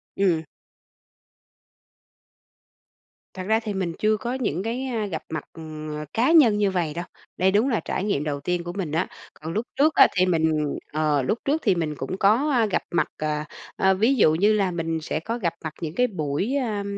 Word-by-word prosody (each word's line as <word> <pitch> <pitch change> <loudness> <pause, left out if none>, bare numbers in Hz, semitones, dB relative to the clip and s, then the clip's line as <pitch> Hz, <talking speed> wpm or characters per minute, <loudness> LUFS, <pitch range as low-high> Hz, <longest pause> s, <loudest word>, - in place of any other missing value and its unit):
Ừm. 175 -5 +2 2.9
Thật 185 - -6
ra 220 +1 +3
thì 215 -3 -4
mình 185 -3 -2
chưa 215 0 +2
có 240 +3 -3
những 205 - -2
cái, 245 +4 -2
a, 230 -5 -2
gặp 170 -5 -4
mặt, 155 -1 -4
ừm, 155 -1 -8
ờ, 150 - -5
cá 250 +8 +3
nhân 250 -11 +6
như 205 -2 +2
vầy 170 -5 -1
đâu. 175 +2 -4 0.3
Đây 190 +1 +3
đúng 215 +7 +3
là 230 - +1
trải - - -3
nghiệm 200 -9 0
đầu 145 -2 -2
tiên 175 +4 -2
của 175 0 -5
mình 180 -6 -3
á. 165 +4 0 0.3
Còn 160 +2 -7
lúc 220 +3 -1
trước 305 +2 +3
á - - +8
thì 185 - +5
mình 160 -4 +1 0.2
ờ, 150 -2 +2
lúc 215 - -1
trước 300 +3 +1
thì 195 -4 +4
mình 155 -3 -2
cũng 160 +8 -4
có, 230 +11 +3
a, 240 -4 +3
gặp 205 - -1
mặt, 175 - +2
ờ, 150 -1 -2 0.3
ờ, 190 0 +3
ví 225 +8 +3
dụ 160 -10 +5
như 205 +5 +4
là 200 -3 +1
mình 165 -1 -2
sẽ 155 - -2
có 225 +8 -3
gặp 175 -8 -1
mặt 155 -1 -4
những 160 +1 -4
cái 250 - +3
buổi, 185 - -2
a, 220 -7 -1
185 Hz, 210 wpm, -24 LUFS, 160-220 Hz, 2.9 s, á